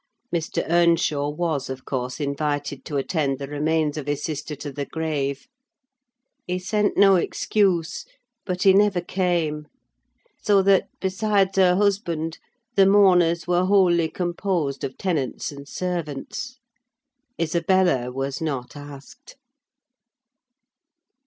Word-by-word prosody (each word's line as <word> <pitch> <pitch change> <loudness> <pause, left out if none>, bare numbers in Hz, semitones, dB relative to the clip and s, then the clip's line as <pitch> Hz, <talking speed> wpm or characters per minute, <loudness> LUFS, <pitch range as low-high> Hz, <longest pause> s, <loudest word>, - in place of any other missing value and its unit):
Mr. 165 -2 -1
Earnshaw 165 -4 +2
was, 150 -3 -2
of 130 0 -7
course, 125 0 -3
invited 145 -1 -2
to 145 - -3
attend 140 -1 -1
the 140 - -5
remains 150 +1 0
of 145 -2 -5
his 145 0 -2
sister 150 -1 -4
to 145 0 -7
the 140 +1 -5
grave; 145 - -3 1.0
he 180 0 -1
sent 205 +3 0
no 195 -1 +6
excuse, 185 - 0 0.4
but 180 -2 -3
he 195 - +7
never 200 -2 +3
came; 170 -4 -1 0.7
so 200 -2 +3
that, 195 -1 +4
besides 195 0 +1
her 180 -2 +5
husband, 175 -5 0 0.4
the 195 -1 +6
mourners 180 -4 +4
were 180 +1 +2
wholly 180 -4 +3
composed 175 -5 -2
of 130 - -4
tenants 155 -10 -2
and 140 0 -11
servants. 180 - -4 0.8
Isabella 170 -5 +1
was 135 +2 -4
not 140 -6 -4
asked. 145 - -12
165 Hz, 120 wpm, -23 LUFS, 145-185 Hz, 1.0 s, he